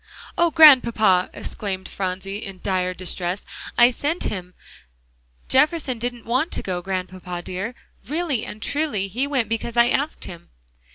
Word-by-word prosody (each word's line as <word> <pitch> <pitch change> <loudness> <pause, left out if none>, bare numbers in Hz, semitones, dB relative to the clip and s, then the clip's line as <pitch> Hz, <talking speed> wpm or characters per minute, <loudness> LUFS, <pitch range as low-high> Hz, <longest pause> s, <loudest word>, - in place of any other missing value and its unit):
"Oh, 345 0 +3
Grandpapa!" 235 - +6
exclaimed 190 -3 -5
Phronsie 195 +2 -4
in 195 -2 -8
dire 185 -2 0
distress, 180 +1 -2 0.3
"I 240 +1 +7
sent 295 +7 -2
him; 180 -2 -4 0.9
Jefferson 265 -2 +2
didn't 240 0 -4
want 255 +8 +1
to - - -3
go, 180 -2 -3
Grandpapa 185 -1 -5
dear, 195 +8 -5 0.3
really 300 -6 -1
and 215 +2 -7
truly, 285 -9 -1
he 250 +8 -1
went 260 -6 0
because 230 +1 -3
I 235 0 +6
asked 285 +4 -1
him." 175 -2 -10
220 Hz, 145 wpm, -23 LUFS, 185-265 Hz, 0.9 s, I